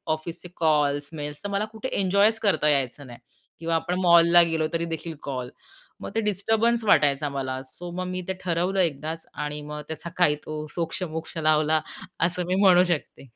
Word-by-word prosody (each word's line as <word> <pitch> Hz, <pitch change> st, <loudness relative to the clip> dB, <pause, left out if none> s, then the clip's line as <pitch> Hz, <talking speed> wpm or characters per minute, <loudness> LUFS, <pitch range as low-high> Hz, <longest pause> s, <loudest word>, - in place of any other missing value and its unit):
ऑफिसचे 170 Hz, +2 st, -7 dB
calls, 145 Hz, -3 st, +1 dB
mails, 150 Hz, 0 st, -6 dB
तर 205 Hz, -, -3 dB
मला 200 Hz, +2 st, 0 dB
कुठे 225 Hz, +4 st, -5 dB
एन्जॉयच 200 Hz, +4 st, +3 dB
करता 155 Hz, -8 st, +2 dB
यायचं 140 Hz, -1 st, 0 dB
नाही 120 Hz, -1 st, -11 dB, 0.4 s
किंवा 165 Hz, 0 st, -1 dB
आपण 180 Hz, +3 st, -1 dB
मॉलला 170 Hz, -1 st, +7 dB
गेलो 160 Hz, -1 st, 0 dB
तरीदेखील 165 Hz, -1 st, -3 dB
कॉल, 130 Hz, -3 st, -4 dB, 0.5 s
मग -, -, -5 dB
ते 225 Hz, -, +2 dB
डिस्टर्बन्स 225 Hz, +3 st, +1 dB
वाटायचा 145 Hz, -6 st, +3 dB
मला 130 Hz, -1 st, -3 dB
सो 175 Hz, 0 st, -8 dB
मग 185 Hz, 0 st, -2 dB
मी 185 Hz, 0 st, -3 dB
ते 190 Hz, -, +1 dB
ठरवलं 180 Hz, +2 st, 0 dB
एकदाच 160 Hz, -1 st, -1 dB
आणि 150 Hz, 0 st, -4 dB
मग 150 Hz, 0 st, -6 dB
त्याचा 160 Hz, +2 st, -6 dB
काही 150 Hz, -5 st, +4 dB
तो 155 Hz, 0 st, -5 dB
सोक्ष 170 Hz, +2 st, -2 dB
मोक्ष 160 Hz, 0 st, -6 dB
लावला 155 Hz, 0 st, +3 dB, 0.4 s
असं 180 Hz, +1 st, -1 dB
मी 185 Hz, -, +1 dB
म्हणू 185 Hz, -2 st, +6 dB
शकते. 165 Hz, -5 st, -3 dB
165 Hz, 175 wpm, -25 LUFS, 150-180 Hz, 0.5 s, मॉलला